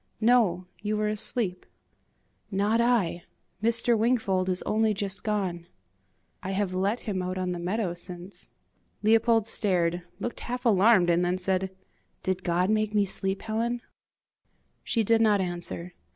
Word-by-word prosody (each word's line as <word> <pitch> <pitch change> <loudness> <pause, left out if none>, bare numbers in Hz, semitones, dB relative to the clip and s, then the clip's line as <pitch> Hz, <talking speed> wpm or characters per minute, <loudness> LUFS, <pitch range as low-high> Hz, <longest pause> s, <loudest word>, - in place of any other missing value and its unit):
"No, 215 -6 +3 0.2
you 210 0 -1
were 210 0 0
asleep." 210 -3 +1 0.9
"Not 205 +3 +1
I! 215 -8 +1 0.4
Mr. 230 +1 +3
Wingfold 215 -5 +1
is 180 0 -1
only 215 0 +1
just 195 0 -3
gone." 185 -5 -2 0.7
"I 190 - -4
have 190 -1 -1
let 200 +5 0
him 195 -4 -3
out 185 +1 -3
on 185 -1 -1
the 175 - -4
meadow 185 +1 -1
since." 175 +2 -11 0.5
Leopold 225 0 +4
stared, 180 -6 +1 0.2
looked 240 - -4
half 250 +1 -5
alarmed, 200 -4 +5
and 170 +1 +2
then 180 +1 0
said, 190 +1 -1 0.5
"Did 185 -1 -2
God 180 +3 +1
make 215 -1 0
me 205 -1 +4
sleep, 195 0 -3
Helen?" 230 +2 -2 1.0
She 230 - 0
did 225 +2 +3
not 210 -2 +4
answer. 175 -1 -4
200 Hz, 145 wpm, -27 LUFS, 180-225 Hz, 1.0 s, alarmed